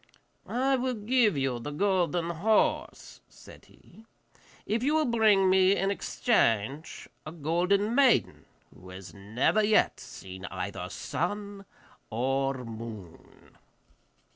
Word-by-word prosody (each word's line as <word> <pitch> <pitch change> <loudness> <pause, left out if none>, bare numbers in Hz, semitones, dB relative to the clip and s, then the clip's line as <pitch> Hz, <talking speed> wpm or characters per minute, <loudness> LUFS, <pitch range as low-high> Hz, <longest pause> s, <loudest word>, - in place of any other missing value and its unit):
'I 265 +2 +1
will 255 0 -2
give 220 - +2
you 135 -3 -1
the 130 - -6
golden 175 0 0
horse,' 210 +7 0
said - - -16
he, 220 - -20 0.6
'if 225 +2 -1
you 290 +5 +1
will 315 -1 +2
bring 220 -5 +3
me 190 +1 +4
in 195 0 0
exchange 140 - -1 0.2
a 155 - -8
golden 175 +7 0
maiden 265 -2 +2 0.3
who 90 +1 -15
has 95 0 -10
never 110 - 0
yet 210 +1 +2
seen 95 0 -10
either 90 -1 -5
sun 200 - -4 0.4
or 135 +2 -1
moon. 110 -6 -11
175 Hz, 115 wpm, -28 LUFS, -, 0.6 s, me